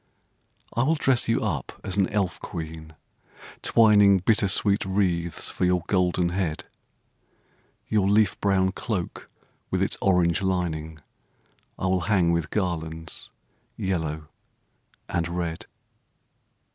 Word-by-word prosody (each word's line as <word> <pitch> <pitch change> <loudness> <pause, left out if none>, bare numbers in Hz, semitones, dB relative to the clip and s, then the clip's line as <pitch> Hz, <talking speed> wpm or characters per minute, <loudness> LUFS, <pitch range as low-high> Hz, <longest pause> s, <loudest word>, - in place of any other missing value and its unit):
I 120 - +2
will 155 +6 +2
dress 135 -6 +2
you 115 - +2
up 80 - -3
as 95 - -2
an 100 -2 +2
elf 100 -4 -1
queen, 80 -2 -7 0.7
twining 105 -3 +5
Bittersweet 100 +1 +2
wreaths 90 -4 -1
for - - -3
your 90 -1 +2
golden 90 -2 +1
head. 85 -3 -2 1.2
Your 100 -3 +2
leaf 105 -1 +3
brown 95 -2 +2
cloak 95 -2 -4 0.4
with - - +1
its - - 0
orange 90 -3 +2
lining 80 -5 -2 0.8
I - - -3
will 95 0 +1
hang 90 -5 +3
with 85 -2 -1
garlands 80 -4 -3 0.5
yellow 80 -5 -3 0.8
and 85 -1 -1
red. 85 -1 -4
90 Hz, 115 wpm, -25 LUFS, 85-100 Hz, 1.2 s, twining